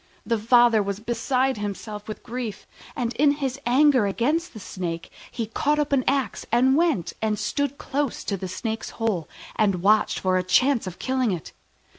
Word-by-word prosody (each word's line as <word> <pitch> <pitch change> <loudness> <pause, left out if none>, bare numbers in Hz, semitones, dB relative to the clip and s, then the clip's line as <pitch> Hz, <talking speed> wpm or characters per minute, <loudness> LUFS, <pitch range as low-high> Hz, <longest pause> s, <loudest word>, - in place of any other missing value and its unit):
The 230 -2 0
father 235 0 +5
was 200 0 -3
beside 255 +3 0
himself 210 +1 -5
with 215 - -7
grief, 235 -4 -5 0.3
and 240 -1 -2
in 285 0 +5
his 275 -2 -3
anger 260 -3 +4
against 295 - 0
the - - -7
Snake 175 -4 -5 0.2
he 230 - -3
caught 290 +7 0
up 295 -1 0
an 265 -2 +3
axe 275 -1 0
and 255 +3 +4
went 315 - +1
and 215 -1 0
stood 280 +6 -2
close 280 -2 -2
to 200 - -2
the 190 0 -5
Snake's 220 +5 -4
hole, 210 -9 -1 0.3
and 195 -5 +1
watched 210 +1 +3
for 185 -1 +1
a 185 - 0
chance 250 +5 +2
of 175 - -6
killing 260 -2 0
it. 175 -4 -5
230 Hz, 180 wpm, -24 LUFS, 205-265 Hz, 0.3 s, father